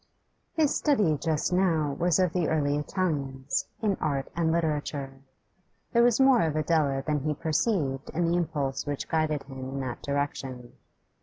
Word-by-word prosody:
His 310 -3 +3
study 210 - +2
just 155 +3 -1
now 165 -6 +2
was 175 +3 +2
of 180 -3 +2
the 175 -3 +1
early 145 -2 +1
Italians, 145 -4 -2 0.2
in 205 -3 +1
art 140 -3 -1
and 165 -1 +1
literature. 150 -4 -2 0.7
There 235 - +5
was 240 0 +4
more 265 -3 +6
of 160 -2 0
Adela 150 -3 +1
than 150 -1 +1
he 150 +2 -1
perceived 155 - 0
in 170 +2 0
the 170 +1 +2
impulse 150 -6 -1
which 145 -1 -3
guided 155 -2 0
him 135 -1 -10
in 130 +1 -5
that 130 -2 -5
direction. 135 -3 -3
155 Hz, 160 wpm, -27 LUFS, 140-175 Hz, 0.7 s, more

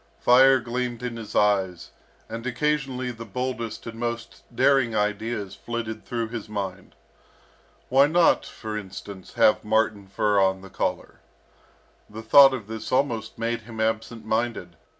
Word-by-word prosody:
Fire 130 - +6
gleamed 120 0 -4
in 120 -1 -3
his 115 -2 -8
eyes, 95 -4 +1 0.4
and 115 +2 -6
occasionally 130 -1 -1
the 115 -1 -9
boldest 115 0 -4
and 115 0 -8
most 115 -1 -4
daring 135 -5 +3
ideas 105 -1 -2
flitted 110 0 -5
through 115 0 -2
his 115 -2 -6
mind. 100 -2 -5 0.9
Why 135 +2 +5
not, 170 +2 +4
for 110 -1 -7
instance, 100 -1 -8
have 105 - +4
marten 105 -2 0
fur 100 +1 +1
on 95 0 +1
the 95 -1 -12
collar? - - -3 0.9
The 110 +2 -9
thought 135 +3 +7
of 115 -5 -7
this 110 +1 -7
almost 120 -5 0
made 115 +1 -2
him 110 0 -10
absent 110 0 -2
minded. 110 -6 -2
115 Hz, 145 wpm, -25 LUFS, 105-120 Hz, 0.9 s, thought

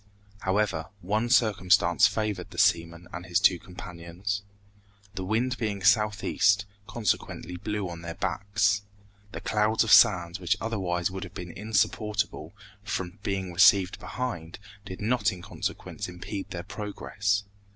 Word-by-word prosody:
However, 95 -5 0
one 110 +6 0
circumstance 95 -7 +4
favored 105 -5 -2
the - - -12
seaman 85 +1 +2
and 85 - -5
his 90 +1 +2
two 95 -3 +4
companions. 90 +2 -5 0.7
The 95 -1 -4
wind 120 +6 0
being 105 -5 -2
southeast, 100 -1 +3 0.2
consequently 105 -5 -2
blew 105 +2 -3
on 85 -1 -7
their 85 0 -6
backs. 100 +2 +1 0.5
The - - -6
clouds 110 +1 +2
of - - -1
sand, 85 0 +6
which 95 +3 0
otherwise 95 -6 -1
would 95 +1 -5
have 95 +1 -10
been 90 -1 -6
insupportable, 105 -4 -1 0.3
from 95 -2 -4
being 95 -3 -3
received 95 +1 +5
behind, 90 -5 -5 0.3
did 95 - -8
not 110 0 +2
in 90 -2 -9
consequence - - -5
impede 95 +3 -6
their 85 -1 -5
progress. 100 -1 -2
100 Hz, 135 wpm, -27 LUFS, 90-105 Hz, 0.7 s, sand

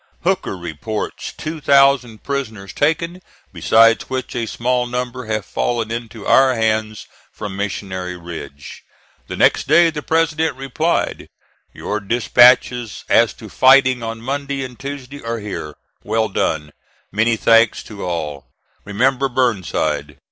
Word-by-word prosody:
Hooker 185 - -1
reports 85 +5 -5
two 155 +1 -6
thousand 135 -5 +3
prisoners 110 -9 -4
taken, 170 +4 0 0.3
besides 115 +1 +4
which 130 -2 -4
a 115 -2 -2
small 125 +2 -1
number 125 0 -4
have 110 -1 -2
fallen 115 -2 -2
into 115 -2 -6
our 130 -1 +5
hands 110 -1 -1 0.3
from 105 -3 -7
Missionary 95 -2 -4
Ridge." 75 -5 -9 0.4
The - - -5
next - - +3
day 170 -1 +5
the 150 -1 -5
President 160 -2 0
replied: 135 +5 -2 0.4
"Your 105 - -4
dispatches 120 +2 +3
as - - +4
to - - -11
fighting 130 -1 +4
on 115 0 -5
Monday 140 +1 -3
and 125 -2 -9
Tuesday 140 0 -7
are 115 0 -3
here. 100 -8 -6 0.3
Well 110 -1 0
done. 75 -5 -1 0.4
Many 115 +3 +2
thanks 115 +1 +4
to 105 -3 -9
all. 75 -5 -4 0.4
Remember 130 +6 +1
Burnside." 90 - -1
115 Hz, 130 wpm, -19 LUFS, 105-135 Hz, 0.4 s, our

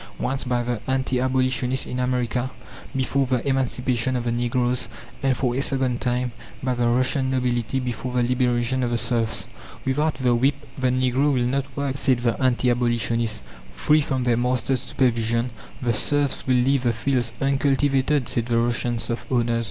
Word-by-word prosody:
Once, 135 0 -1
by 125 -1 0
the 120 -3 -2
anti 130 -1 0
abolitionists 130 0 +1
in 125 - -4
America 125 0 0 0.5
before 135 0 +1
the 125 +1 -1
emancipation 130 -2 0
of 125 - -1
the 120 - -1
Negroes, 120 +1 0 0.3
and, 135 -2 +1
for 125 -3 0
a 135 - 0
second 130 -3 0
time, 125 0 0 0.3
by 130 -1 +1
the 120 -1 +1
Russian 130 +2 +1
nobility 125 -1 0
before 125 0 -4
the 125 -1 +2
liberation 125 0 +1
of 120 - 0
the 120 - 0
serfs? 115 -2 0 0.4
"Without 150 +4 +1
the 125 -2 +1
whip 130 +4 +3 0.2
the 130 -1 +1
Negro 130 +3 +2
will 125 -3 +1
not 135 +2 0
work," 140 -1 -1
said 130 -4 +2
the 120 -1 +2
anti 125 -1 +2
abolitionist. 120 - 0 0.3
"Free 150 - +3
from 135 -3 -1
their 120 -2 +2
master's 125 +1 0
supervision 120 -1 0 0.3
the 120 -1 +2
serfs 145 +5 +1
will 130 - +3
leave 130 +2 +3
the 120 -2 +1
fields 120 -1 0
uncultivated," 135 0 +2
said 115 -1 -1
the 120 -1 +1
Russian 120 0 0
serf 115 +1 -3
owners. 120 -2 +2
125 Hz, 175 wpm, -23 LUFS, 120-130 Hz, 0.5 s, whip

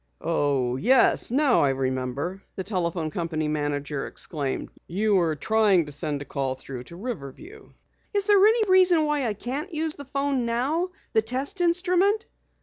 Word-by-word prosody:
"Oh, 140 -6 0
yes, 250 - +3
now 270 +1 +3
I 140 - +3
remember!" 135 +7 -2
the 190 - -4
telephone 170 -5 -2
company 160 -2 -2
manager 145 -1 -2
exclaimed. 145 -5 -3 0.2
"You're 185 -4 +1
trying 205 0 +2
to 150 - -9
send 145 0 -2
a - - -17
call 135 -2 -2
through 130 -2 -8
to 170 - -12
Riverview." 240 - -8 0.4
"Is 405 -1 +1
there 405 -2 +5
any 440 0 +4
reason 365 -4 +5
why 295 -4 0
I 210 - -2
can't 275 - -5
use 315 -1 -1
the 285 - -10
phone 275 -2 -1
now 285 +10 0 0.2
the 220 - +4
test 265 - -2
instrument?" 365 +4 +2
215 Hz, 155 wpm, -25 LUFS, -, 0.4 s, there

